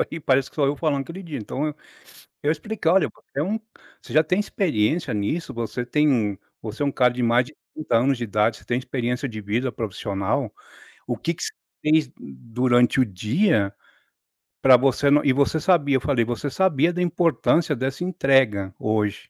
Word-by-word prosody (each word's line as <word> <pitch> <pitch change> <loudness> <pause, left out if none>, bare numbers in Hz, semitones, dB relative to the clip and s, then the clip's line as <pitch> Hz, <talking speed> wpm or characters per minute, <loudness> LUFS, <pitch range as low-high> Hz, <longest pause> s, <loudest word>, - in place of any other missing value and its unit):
aí, 165 - -2
parece 135 -1 +1
que - - -25
sou 140 -2 +2
eu 145 - 0
falando 145 -2 0
aquele 175 +7 -9
dia. 155 -5 -6
Então 130 +7 -3
eu 150 - -3 0.7
eu 150 - +2
expliquei: 180 0 -2
"Olha, 190 -2 +4
você 140 - -8
é - - +2
um 210 +6 -1 0.4
você - - -12
já 155 - +5
tem 180 +4 0
experiência 165 - 0
nisso. 105 +12 -2
Você 120 +1 -3
tem 150 +4 +2
um 105 -6 +1 0.3
você 110 +6 -5
é - - +1
um 140 - 0
cara 125 -1 +3
de 125 0 -3
mais 120 +1 +3
de 150 - -15 0.2
30 150 -7 -1
anos 130 +2 +2
de 120 - -3
idade, 105 +1 +1
você - - -19
tem 120 0 -1
experiência 125 +1 -3
de 110 -2 -7
vida 115 +5 -2
profissional. 100 -2 -3 0.5
O - - -2
que 170 - -2
que 180 - -10
você - - -3 0.3
fez 150 -3 +2
durante 120 - +1
o 130 - +5
dia 105 - +1 0.9
para 130 -2 +8
você 135 +2 +2
não 145 +1 +4
e 135 - +4
você 140 +3 +1
sabia", 145 -5 +2
eu 130 - +1
falei, 130 -5 +1
"você 120 +5 -3
sabia 170 0 +2
da 180 - -2
importância 165 -2 +1
dessa 135 +5 -3
entrega 135 - +2
hoje", 105 -1 -1
135 Hz, 200 wpm, -23 LUFS, 115-155 Hz, 0.9 s, para